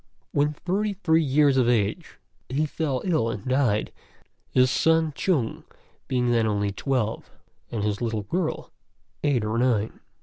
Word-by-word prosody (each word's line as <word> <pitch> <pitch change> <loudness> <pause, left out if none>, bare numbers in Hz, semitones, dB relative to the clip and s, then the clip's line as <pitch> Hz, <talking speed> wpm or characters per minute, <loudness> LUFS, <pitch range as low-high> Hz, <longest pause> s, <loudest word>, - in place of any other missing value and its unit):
When 145 +1 +1
thirty 200 +6 -1
three 165 -4 +2
years 140 -1 +3
of 125 -2 +3
age 105 -4 0 0.3
he 145 +4 +1
fell 145 -4 -2
ill 155 -11 +1
and 105 -3 -5
died, 130 -5 +1 0.6
his 130 0 +3
son 160 0 +2
Chung 140 -12 0 0.4
being 125 -1 +1
then 115 -2 +2
only 105 -1 0
twelve 115 0 -2 0.4
and 110 -3 -3
his 105 0 -1
little 110 -3 -1
girl 165 - -3 0.5
eight 135 -7 +2
or 110 +2 -1
nine. 115 -4 +1
130 Hz, 145 wpm, -25 LUFS, 110-155 Hz, 0.6 s, years